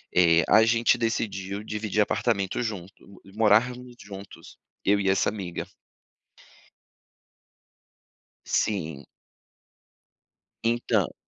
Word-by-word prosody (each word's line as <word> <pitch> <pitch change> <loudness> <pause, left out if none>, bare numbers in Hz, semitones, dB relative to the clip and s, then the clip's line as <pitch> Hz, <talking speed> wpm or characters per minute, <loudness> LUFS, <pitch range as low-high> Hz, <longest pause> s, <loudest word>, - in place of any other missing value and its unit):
eh, 85 -2 +5
a 110 +1 +6
gente 115 +1 +3
decidiu 105 -3 -2
dividir 105 0 -1
apartamento 105 0 0
junto, 100 -2 -8
morarmos 120 +3 +2
juntos, 100 -1 -11 0.3
eu 100 +1 +3
e 95 -1 +1
essa 95 +1 +2
amiga. 95 -5 -5 2.8
Sim. 80 -9 -1 1.6
Entã 115 -4 +1
105 Hz, 80 wpm, -26 LUFS, 95-115 Hz, 2.8 s, a